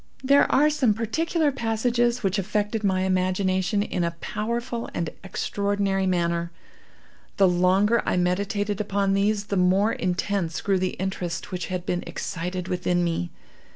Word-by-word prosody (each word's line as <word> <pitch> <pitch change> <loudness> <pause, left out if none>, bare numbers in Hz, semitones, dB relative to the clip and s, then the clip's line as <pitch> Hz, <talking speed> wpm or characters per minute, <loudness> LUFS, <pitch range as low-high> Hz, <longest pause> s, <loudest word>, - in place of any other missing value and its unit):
There 280 +2 +4
are 300 +2 +4
some 260 -8 +2
particular 300 +7 0
passages 240 0 0
which 195 +1 +1
affected 210 +2 -1
my 190 -2 +2
imagination 185 +1 +1
in 180 - -2
a 170 0 -2
powerful 235 +5 -3
and 170 -2 -2
extraordinary 200 0 -1
manner. 170 -1 0 0.9
The 195 - +6
longer 185 +6 +3
I - - 0
meditated 200 +3 0
upon 200 -1 0
these 205 +1 +1
the 200 -1 -2
more 190 +4 +3
intense 180 -1 -1
grew 195 -2 +1
the 185 0 -1
interest 185 -2 -4
which 180 -1 -3
had 180 -1 -4
been 180 0 -1
excited 180 0 -4
within 180 -1 0
me. 165 - -1
195 Hz, 145 wpm, -25 LUFS, 180-215 Hz, 0.9 s, The